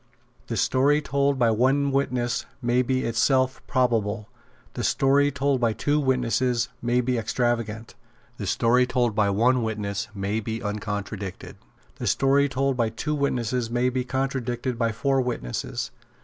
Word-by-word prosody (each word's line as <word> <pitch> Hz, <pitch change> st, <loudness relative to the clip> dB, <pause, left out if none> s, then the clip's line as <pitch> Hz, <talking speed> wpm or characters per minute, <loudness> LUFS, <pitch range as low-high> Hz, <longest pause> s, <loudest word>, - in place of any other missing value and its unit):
The 115 Hz, -, -3 dB
story 140 Hz, +7 st, +3 dB
told 140 Hz, -1 st, 0 dB
by 120 Hz, -3 st, +3 dB
one 135 Hz, +5 st, +2 dB
witness 125 Hz, -3 st, -1 dB
may 120 Hz, -1 st, +2 dB
be 130 Hz, +1 st, 0 dB
in -, -, -3 dB
itself 130 Hz, +4 st, +2 dB
probable. 115 Hz, -4 st, 0 dB, 0.4 s
The -, -, -4 dB
story 140 Hz, +1 st, +3 dB
told 140 Hz, -1 st, 0 dB
by 115 Hz, -2 st, +2 dB
two 145 Hz, +7 st, 0 dB
witnesses 125 Hz, -2 st, +1 dB
may 120 Hz, +1 st, +2 dB
be 125 Hz, -1 st, 0 dB
extravagant. 115 Hz, -1 st, -2 dB, 0.4 s
The 100 Hz, -, -5 dB
story 125 Hz, +5 st, +3 dB
told 125 Hz, -3 st, +1 dB
by 105 Hz, -1 st, +2 dB
one 120 Hz, +6 st, +3 dB
witness 105 Hz, -3 st, -3 dB
may 100 Hz, +2 st, -1 dB
be 110 Hz, +1 st, -4 dB
uncontradicted. 105 Hz, -2 st, -5 dB, 0.4 s
The -, -, -4 dB
story 140 Hz, +1 st, +3 dB
told 135 Hz, +1 st, 0 dB
by 115 Hz, -2 st, +1 dB
two 150 Hz, +7 st, -3 dB
witnesses 125 Hz, -4 st, -1 dB
may 120 Hz, +2 st, +1 dB
be 130 Hz, 0 st, -1 dB
contradicted 130 Hz, -2 st, -2 dB
by 115 Hz, -1 st, +1 dB
four 135 Hz, +4 st, +1 dB
witnesses. 115 Hz, -, -3 dB
125 Hz, 150 wpm, -25 LUFS, 115-135 Hz, 0.4 s, story